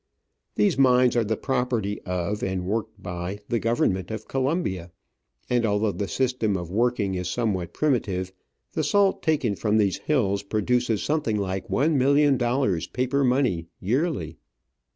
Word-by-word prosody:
These 105 +5 +2
mines 125 -2 +5
are 120 - +3
the 110 0 -1
property 125 -6 -1
of, 90 +3 -2
and 95 -1 -2
worked 110 +1 -3
by, 90 +2 -4
the 120 - +1
Government 110 -5 0
of 110 -1 -6
Colombia; 130 - -1 0.6
and 120 -1 +1
although 105 -1 +1
the 100 0 -3
system 125 -6 0
of 85 -1 -6
working 110 -2 +1
is 90 -1 -3
somewhat 100 -8 -1
primitive, 95 -11 -1 0.4
the 155 - -1
salt 195 +6 +2
taken 145 - +1
from 105 +2 +1
these 100 -3 +1
hills 100 -10 +1
produces 110 +2 0
something 145 -8 0
like 95 +2 -3
one 140 +9 +2
million 140 +2 +4
dollars 120 - 0
paper 130 +2 0
money 125 -10 +1
yearly. 115 - -1
110 Hz, 150 wpm, -25 LUFS, 95-130 Hz, 0.6 s, mines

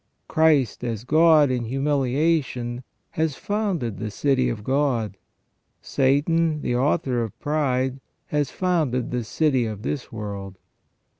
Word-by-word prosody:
Christ 150 -9 +2
as 115 -3 -3
God 155 0 +5
in 125 -2 -1
humiliation 135 -1 0 0.3
has 160 -3 -1
founded 190 - -2
the 110 - -3
city 130 +3 +1
of 110 -3 -4
God: 130 -6 0 0.6
Satan 150 +3 +1
the 120 - 0
author 130 -1 +1
of 110 -4 -5
pride 135 -3 0 0.3
has 150 -1 0
founded 155 -10 0
the 125 -1 -1
city 130 +1 +1
of 105 -1 -6
this 145 -4 -4
world. 100 -3 -6
130 Hz, 125 wpm, -24 LUFS, 120-150 Hz, 0.6 s, God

